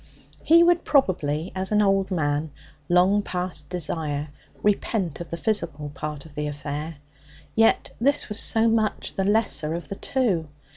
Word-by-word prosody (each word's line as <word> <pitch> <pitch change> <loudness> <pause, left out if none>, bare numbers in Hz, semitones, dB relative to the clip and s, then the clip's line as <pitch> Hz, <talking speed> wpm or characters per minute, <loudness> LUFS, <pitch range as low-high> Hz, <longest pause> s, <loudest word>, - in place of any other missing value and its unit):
He 335 +1 +6
would 345 0 +3
probably, 170 - +1
as 190 +1 -3
an 210 - +3
old 195 -2 +2
man, 155 -3 -1 0.4
long 185 +4 +4
past 180 -6 -4
desire, 155 -4 -3 0.3
repent 200 -5 0
of 170 - -7
the 170 - -4
physical 165 -8 -2
part 150 0 -6
of 155 - -14
the 150 0 -3
affair. 145 +2 -5 0.6
Yet 225 0 +3
this 280 +4 +2
was 210 0 +1
so 225 0 +3
much 220 -1 0
the 195 - -1
lesser 200 -6 +1
of 170 - -7
the 195 - -4
two. 195 - 0
180 Hz, 155 wpm, -24 LUFS, 150-210 Hz, 0.6 s, He